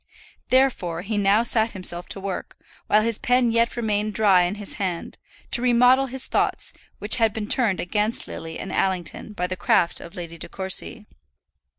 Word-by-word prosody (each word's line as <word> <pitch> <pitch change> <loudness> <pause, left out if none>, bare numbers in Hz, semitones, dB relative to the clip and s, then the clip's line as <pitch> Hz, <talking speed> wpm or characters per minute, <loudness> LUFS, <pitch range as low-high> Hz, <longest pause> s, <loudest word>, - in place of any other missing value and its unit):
Therefore 215 -11 +1
he 215 +2 -3
now 205 +2 +3
sat 225 -1 +1
himself 175 -1 -1
to - - -5
work, 195 -1 -6 0.3
while 215 0 +4
his 230 -1 0
pen 245 -1 +2
yet 230 +1 +1
remained 215 -2 -1
dry 200 -4 +5
in 175 +3 -1
his 205 -1 -4
hand, 180 -3 -4 0.3
to 240 - +4
remodel 250 +2 +4
his 260 +1 +1
thoughts, - - -1 0.2
which 210 +4 +3
had 225 -3 +2
been 220 -1 -4
turned 220 -7 +1
against 210 +5 -1
Lily 160 0 -7
and 190 - -6
Allington 190 +2 -2
by 180 -3 -2
the 185 +1 -3
craft 170 -1 +1
of 170 - -11
Lady 170 -2 -8
De - - -7
Courcy. 190 +2 -1
210 Hz, 180 wpm, -23 LUFS, 185-230 Hz, 0.3 s, dry